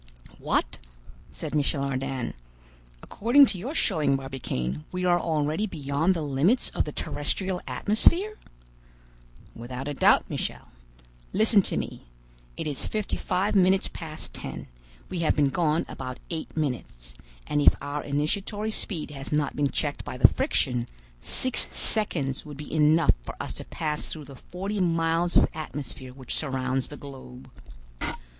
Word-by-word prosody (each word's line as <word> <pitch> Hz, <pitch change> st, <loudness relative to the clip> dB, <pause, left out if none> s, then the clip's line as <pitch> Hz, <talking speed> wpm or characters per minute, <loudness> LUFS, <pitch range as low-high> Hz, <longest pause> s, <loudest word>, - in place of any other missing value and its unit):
"What!" -, -, 0 dB, 0.5 s
said -, -, -4 dB
Michel 145 Hz, -1 st, +2 dB
Ardan. 135 Hz, -2 st, -2 dB, 0.7 s
"According 245 Hz, +7 st, +5 dB
to 195 Hz, -7 st, -3 dB
your 265 Hz, -, -4 dB
showing, 155 Hz, -, +2 dB
Barbicane, 100 Hz, -, -3 dB
we 180 Hz, 0 st, -2 dB
are 175 Hz, -1 st, +4 dB
already 155 Hz, +4 st, 0 dB
beyond 155 Hz, +2 st, +1 dB
the 165 Hz, -, -2 dB
limits 150 Hz, -, +2 dB
of -, -, 0 dB
the 150 Hz, -, -4 dB
terrestrial 180 Hz, +7 st, -2 dB
atmosphere?" 350 Hz, -, +2 dB, 1.2 s
"Without 125 Hz, +3 st, -6 dB
a 145 Hz, -, -2 dB
doubt, -, -, +4 dB
Michel. -, -, -4 dB, 0.6 s
Listen 215 Hz, 0 st, +5 dB
to -, -, -2 dB
me. -, -, -5 dB, 0.5 s
It -, -, -3 dB
is 145 Hz, -3 st, -2 dB
fifty 215 Hz, -1 st, -1 dB
five 190 Hz, +3 st, 0 dB
minutes 190 Hz, 0 st, +4 dB
past 160 Hz, -2 st, -6 dB
ten; -, -, -6 dB, 0.4 s
we 180 Hz, -, -4 dB
have 165 Hz, -, +2 dB
been 145 Hz, -2 st, +3 dB
gone 160 Hz, +2 st, +1 dB
about 130 Hz, -1 st, -6 dB
eight 160 Hz, -1 st, -5 dB
minutes; 90 Hz, -, -3 dB, 0.3 s
and 145 Hz, 0 st, +1 dB
if -, -, +7 dB
our 145 Hz, +1 st, -3 dB
initiatory 200 Hz, +9 st, -1 dB
speed 170 Hz, -8 st, -2 dB
has 135 Hz, -2 st, -6 dB
not 150 Hz, -1 st, +1 dB
been 145 Hz, -1 st, +2 dB
checked 145 Hz, +2 st, -2 dB
by -, -, -6 dB
the 125 Hz, -2 st, +9 dB
friction, 125 Hz, -, 0 dB, 0.3 s
six 255 Hz, -, +1 dB
seconds 145 Hz, -, +1 dB
would 150 Hz, -2 st, -9 dB
be 150 Hz, 0 st, -8 dB
enough 155 Hz, 0 st, +5 dB
for -, -, -7 dB
us -, -, -3 dB
to -, -, -7 dB
pass 150 Hz, -2 st, -3 dB
through 155 Hz, -2 st, -6 dB
the 135 Hz, 0 st, -11 dB
forty 195 Hz, +9 st, -4 dB
miles 165 Hz, -1 st, +2 dB
of -, -, +6 dB
atmosphere 135 Hz, -4 st, -6 dB
which 130 Hz, -1 st, -6 dB
surrounds 130 Hz, -2 st, -1 dB
the 145 Hz, -, -9 dB
globe." 130 Hz, -2 st, -11 dB
150 Hz, 150 wpm, -27 LUFS, 135-180 Hz, 1.2 s, the